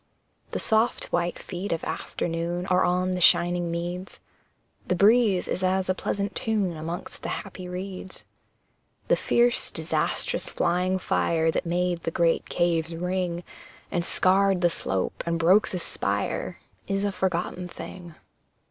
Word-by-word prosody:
The -, -, -3 dB
soft 220 Hz, +1 st, +2 dB
white 175 Hz, 0 st, 0 dB
feet 185 Hz, +2 st, -5 dB
of 165 Hz, -, -1 dB
afternoon 170 Hz, +1 st, -3 dB
Are 185 Hz, -1 st, +3 dB
on 180 Hz, +1 st, +1 dB
the 180 Hz, 0 st, -1 dB
shining 175 Hz, 0 st, +4 dB
meads, 175 Hz, +2 st, -4 dB, 0.7 s
The 180 Hz, -, +2 dB
breeze 205 Hz, 0 st, +4 dB
is -, -, -2 dB
as 185 Hz, 0 st, +1 dB
a -, -, +4 dB
pleasant 200 Hz, +2 st, -2 dB
tune 205 Hz, -6 st, 0 dB
Amongst 165 Hz, +3 st, -6 dB
the -, -, -4 dB
happy 185 Hz, -1 st, -5 dB
reeds. 185 Hz, +1 st, -7 dB, 0.9 s
The -, -, +6 dB
fierce, 240 Hz, 0 st, +2 dB
disastrous, -, -, -1 dB
flying 180 Hz, +2 st, +1 dB
fire, 165 Hz, -3 st, +1 dB
That 170 Hz, -, -2 dB
made 175 Hz, 0 st, 0 dB
the -, -, -2 dB
great 165 Hz, 0 st, +1 dB
caves 170 Hz, -1 st, 0 dB
ring, 180 Hz, 0 st, -2 dB, 0.5 s
And 175 Hz, -, 0 dB
scarred 190 Hz, +1 st, +3 dB
the 175 Hz, -1 st, +4 dB
slope, 95 Hz, -, -2 dB
and 170 Hz, 0 st, +1 dB
broke 180 Hz, +6 st, +5 dB
the 185 Hz, -, -3 dB
spire, 175 Hz, -, -2 dB, 0.3 s
Is 195 Hz, 0 st, 0 dB
a 205 Hz, -, +1 dB
forgotten 180 Hz, -1 st, -2 dB
thing. 175 Hz, -1 st, -9 dB
180 Hz, 145 wpm, -26 LUFS, 170-190 Hz, 0.9 s, The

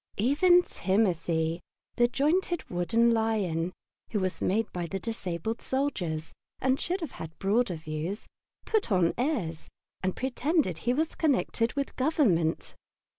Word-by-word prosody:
Even 350 Hz, -, +5 dB
Timothy, 170 Hz, -, 0 dB, 0.3 s
the 240 Hz, -, +4 dB
jointed 335 Hz, +7 st, 0 dB
wooden 225 Hz, +7 st, +3 dB
lion, 205 Hz, -7 st, 0 dB, 0.4 s
who 210 Hz, -, +1 dB
was 185 Hz, -1 st, -2 dB
made 220 Hz, +4 st, +2 dB
by 175 Hz, -1 st, -3 dB
the 195 Hz, -, -3 dB
disabled 220 Hz, 0 st, -3 dB
soldiers, 180 Hz, -, -2 dB, 0.3 s
and 260 Hz, +1 st, +2 dB
should 365 Hz, +2 st, -2 dB
have 315 Hz, -7 st, -4 dB
had 160 Hz, 0 st, -8 dB
broader 200 Hz, -1 st, +1 dB
views, 155 Hz, +5 st, -4 dB, 0.4 s
put 435 Hz, -, 0 dB
on 180 Hz, -3 st, +3 dB
airs 225 Hz, -, -2 dB, 0.3 s
and 185 Hz, 0 st, -1 dB
pretended 265 Hz, -, 0 dB
he 240 Hz, +8 st, +1 dB
was 315 Hz, +3 st, 0 dB
connected 245 Hz, -6 st, +1 dB
with 280 Hz, -1 st, -3 dB
Government. 235 Hz, -, +2 dB
220 Hz, 130 wpm, -29 LUFS, 175-270 Hz, 0.4 s, Even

